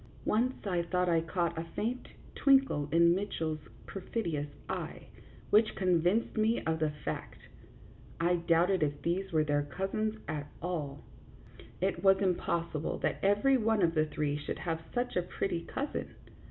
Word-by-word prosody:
Once 245 Hz, +4 st, +1 dB
I 180 Hz, -3 st, +1 dB
thought 180 Hz, +1 st, 0 dB
I 165 Hz, -1 st, +3 dB
caught 170 Hz, 0 st, -1 dB
a -, -, -2 dB
faint 240 Hz, +4 st, -2 dB, 0.3 s
twinkle 270 Hz, -, +3 dB
in 170 Hz, +1 st, +6 dB
Mitch 200 Hz, +3 st, -2 dB
ell's 155 Hz, -1 st, -1 dB, 0.3 s
perfidious 170 Hz, -, -3 dB, 0.2 s
eye, -, -, -5 dB, 0.4 s
which 215 Hz, +1 st, +4 dB
convinced 180 Hz, +4 st, +2 dB
me 220 Hz, +2 st, +3 dB
of 160 Hz, 0 st, 0 dB
the 155 Hz, -1 st, +2 dB
fact. 150 Hz, -1 st, -5 dB, 0.8 s
I 175 Hz, +1 st, +3 dB
doubted 170 Hz, +2 st, +3 dB
if 145 Hz, -1 st, 0 dB
these 190 Hz, +3 st, -1 dB
were 155 Hz, -2 st, +3 dB
their 145 Hz, -1 st, +1 dB
cousins 195 Hz, +8 st, -2 dB
at 145 Hz, -1 st, -3 dB
all; 155 Hz, -5 st, -4 dB, 0.8 s
it 190 Hz, +1 st, 0 dB
was 195 Hz, -1 st, +6 dB
impossible 170 Hz, -4 st, -1 dB
that -, -, 0 dB
every 205 Hz, +8 st, +4 dB
one 220 Hz, -3 st, +2 dB
of 165 Hz, -1 st, +3 dB
the 155 Hz, -1 st, +2 dB
three 150 Hz, -1 st, -1 dB
should 145 Hz, -, -4 dB
have 165 Hz, -2 st, -3 dB
such 245 Hz, 0 st, -1 dB
a 180 Hz, -, +3 dB
pretty 175 Hz, -1 st, -3 dB
cousin. 285 Hz, +1 st, -3 dB
175 Hz, 155 wpm, -31 LUFS, 160-200 Hz, 0.8 s, in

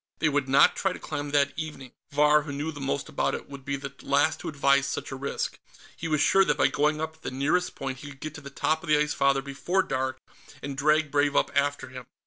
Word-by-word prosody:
They 155 Hz, -, +2 dB
would 145 Hz, -2 st, 0 dB
not 135 Hz, -, +6 dB
try -, -, 0 dB
to -, -, -9 dB
climb 145 Hz, 0 st, -4 dB
that 140 Hz, -1 st, +2 dB
evening; 150 Hz, -5 st, -6 dB, 0.2 s
Vahr, 150 Hz, +1 st, +4 dB
who 145 Hz, 0 st, -7 dB
knew 145 Hz, +3 st, -3 dB
the 145 Hz, -, -9 dB
most 135 Hz, 0 st, -2 dB
about -, -, -1 dB
it, -, -, -8 dB
would 140 Hz, -1 st, -10 dB
be 140 Hz, +1 st, -2 dB
the 140 Hz, 0 st, -7 dB
last 145 Hz, +3 st, +2 dB
to -, -, -5 dB
advise 140 Hz, -1 st, +3 dB
such -, -, -4 dB
a -, -, -4 dB
risk. 140 Hz, +1 st, -3 dB, 0.4 s
He 165 Hz, -, -5 dB
was 155 Hz, -2 st, +1 dB
sure 195 Hz, -, +5 dB
that -, -, +1 dB
by -, -, +4 dB
going 150 Hz, +1 st, +1 dB
up 160 Hz, 0 st, -4 dB
at -, -, -31 dB
the -, -, -4 dB
nearest 145 Hz, +7 st, 0 dB
point 135 Hz, -2 st, -5 dB
he 145 Hz, -, -9 dB
could 140 Hz, -1 st, -13 dB
get 155 Hz, 0 st, -6 dB
to 155 Hz, -, -9 dB
the 140 Hz, -, -9 dB
top 155 Hz, +3 st, 0 dB
of 170 Hz, -, -9 dB
the 150 Hz, -, +5 dB
Ice 150 Hz, 0 st, +1 dB
Father 135 Hz, 0 st, +2 dB
before 175 Hz, +7 st, 0 dB
dark, 130 Hz, -2 st, -2 dB, 0.4 s
and 140 Hz, 0 st, -4 dB
drag 150 Hz, +1 st, +2 dB
Brave 145 Hz, 0 st, +2 dB
up -, -, +2 dB
after 140 Hz, -2 st, 0 dB
him. 125 Hz, -1 st, -10 dB
145 Hz, 260 wpm, -27 LUFS, 140-150 Hz, 0.4 s, not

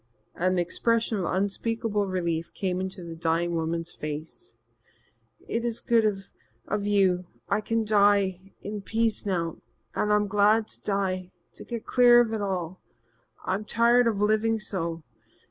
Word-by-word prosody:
An 185 Hz, +1 st, 0 dB
expression 225 Hz, +5 st, +1 dB
of 180 Hz, -, -1 dB
unspeakable 205 Hz, +2 st, -1 dB
relief 170 Hz, -3 st, -2 dB
came 185 Hz, -1 st, -1 dB
into 190 Hz, -1 st, -5 dB
the 165 Hz, -1 st, -7 dB
dying 165 Hz, +1 st, 0 dB
woman's 165 Hz, +1 st, -2 dB
face. 155 Hz, -, -6 dB, 0.9 s
"It 230 Hz, -, -2 dB
is 235 Hz, -1 st, -2 dB
good 230 Hz, -2 st, +2 dB, 0.6 s
of 205 Hz, -1 st, -1 dB
you. 185 Hz, -3 st, +2 dB, 0.2 s
I -, -, +1 dB
can 225 Hz, +1 st, -1 dB
die 200 Hz, -3 st, +2 dB
in 205 Hz, 0 st, -5 dB
peace 225 Hz, 0 st, -1 dB
now. 170 Hz, -4 st, -1 dB, 0.4 s
I'm 210 Hz, 0 st, +2 dB
glad 210 Hz, +2 st, +3 dB
to -, -, -9 dB
die 190 Hz, -2 st, -1 dB, 0.2 s
to -, -, -10 dB
get 235 Hz, -2 st, -6 dB
clear 245 Hz, -1 st, +6 dB
of 230 Hz, -2 st, +2 dB
it 220 Hz, -, -2 dB
all. 185 Hz, -3 st, -3 dB, 0.6 s
I'm 190 Hz, +3 st, -1 dB
tired 235 Hz, +2 st, +4 dB
of 220 Hz, -3 st, +1 dB
living 215 Hz, +2 st, +2 dB
so. 170 Hz, -5 st, -3 dB
200 Hz, 145 wpm, -27 LUFS, 180-220 Hz, 0.9 s, clear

